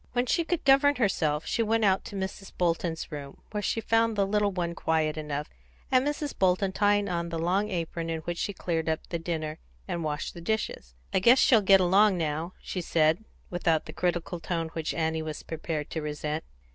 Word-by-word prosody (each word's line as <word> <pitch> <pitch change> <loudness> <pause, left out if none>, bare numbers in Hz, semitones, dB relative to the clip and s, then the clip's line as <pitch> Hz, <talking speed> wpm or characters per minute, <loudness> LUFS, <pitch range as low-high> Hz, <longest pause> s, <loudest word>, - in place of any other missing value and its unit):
When 245 0 +1
she 335 - +2
could 335 -1 -2
govern 280 +1 +6
herself, 160 - +1
she - - 0
went 225 0 +2
out 190 -1 +3
to - - -8
Mrs. 195 0 -5
Bolton's 170 -2 -1
room, 140 -2 -8
where 210 -1 -2
she 225 - 0
found 225 0 +2
the 200 -1 +2
little 205 0 +1
one 175 -2 -2
quiet 160 -2 0
enough, 150 -1 -3 0.4
and 255 -1 +5
Mrs. 295 0 -2
Bolton 190 +1 +2
tying 205 +1 +2
on 170 -2 -2
the 165 - -3
long 185 +6 +1
apron 170 -2 -3
in 165 -1 -2
which 170 +1 -4
she - - -1
cleared 165 -4 -2
up 160 - -1
the 170 - -2
dinner 160 -2 -3 0.3
and 170 - -2
washed 150 0 -3
the 170 - -9
dishes. 170 - -3 0.2
"I - - +4
guess 235 +7 +6
she'll 230 -4 +5
get 195 -1 +6
along 190 +2 +4
now," 160 +2 -2
she 185 - -3
said, 160 +3 +2 0.3
without 165 -3 +1
the 155 - -8
critical 175 0 -1
tone 165 0 -2
which 160 -1 -3
Annie 160 -1 0
was 155 -1 -5
prepared 160 -2 -4
to 160 - -2
resent. 150 +1 -3
175 Hz, 205 wpm, -28 LUFS, 160-205 Hz, 0.4 s, govern